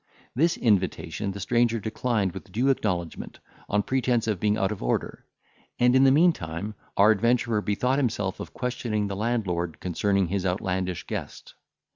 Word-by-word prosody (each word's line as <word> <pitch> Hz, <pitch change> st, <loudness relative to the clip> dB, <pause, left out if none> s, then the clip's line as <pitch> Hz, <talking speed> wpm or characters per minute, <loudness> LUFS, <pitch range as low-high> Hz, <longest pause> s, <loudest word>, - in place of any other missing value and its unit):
This 165 Hz, +6 st, +2 dB
invitation 100 Hz, -2 st, 0 dB
the 100 Hz, -, -7 dB
stranger 115 Hz, +2 st, +1 dB
declined 110 Hz, -2 st, -1 dB
with 95 Hz, +1 st, -10 dB
due 120 Hz, +8 st, +1 dB
acknowledgment, 90 Hz, -10 st, -2 dB, 0.3 s
on 105 Hz, 0 st, +2 dB
pretence 125 Hz, 0 st, +1 dB
of 105 Hz, -5 st, -1 dB
being 105 Hz, +1 st, +1 dB
out 95 Hz, -1 st, 0 dB
of 105 Hz, -, -5 dB
order; -, -, -2 dB, 0.5 s
and, 125 Hz, +1 st, +4 dB
in 130 Hz, +1 st, +6 dB
the 135 Hz, -, +6 dB
meantime, 105 Hz, -, +1 dB, 0.2 s
our 105 Hz, +2 st, +7 dB
adventurer 115 Hz, +1 st, +2 dB
bethought 125 Hz, +7 st, 0 dB
himself 105 Hz, -7 st, -1 dB
of -, -, -7 dB
questioning 120 Hz, -4 st, -2 dB
the 100 Hz, -, -3 dB
landlord 95 Hz, -7 st, -2 dB
concerning 100 Hz, +2 st, +1 dB
his 95 Hz, 0 st, -1 dB
outlandish 90 Hz, -1 st, -2 dB
guest. -, -, -6 dB
105 Hz, 155 wpm, -26 LUFS, 95-120 Hz, 0.5 s, our